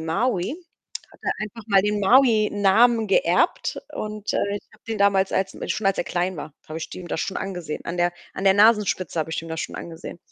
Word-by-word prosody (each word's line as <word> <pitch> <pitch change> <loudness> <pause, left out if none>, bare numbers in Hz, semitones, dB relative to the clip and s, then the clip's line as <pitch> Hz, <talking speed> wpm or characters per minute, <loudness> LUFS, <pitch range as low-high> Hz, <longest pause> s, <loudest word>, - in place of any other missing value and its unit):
Maui. 195 - -1 0.6
Hat - - -19
er - - 0
einfach 215 +1 -7
mal 195 -2 +5
den 210 0 0
Maui-Namen 220 -1 +4
geerbt - - +2
und, 215 -1 -4
äh, 200 0 0
ich - - -11
habe - - -22
den 225 -1 -3
damals 195 -1 +3
als 190 0 -1 0.2
schon 215 - -2
als 195 - +2
er - - 0
klein 180 0 -2
war, 150 0 -8
habe 155 +1 -5
ich - - -6
dem 180 -2 -9
das - - -2
schon 190 - -3
angesehen. 180 -5 -5
An 170 - -4
der 175 0 +1 0.2
an 190 - -5
der 195 0 +6
Nasenspitze 205 -6 +3
habe 160 +1 -1
ich 165 - -3
ihm 165 - -9
das 160 0 -4
schon - - -5
angesehen. 170 +1 -8
195 Hz, 215 wpm, -23 LUFS, 175-215 Hz, 0.6 s, der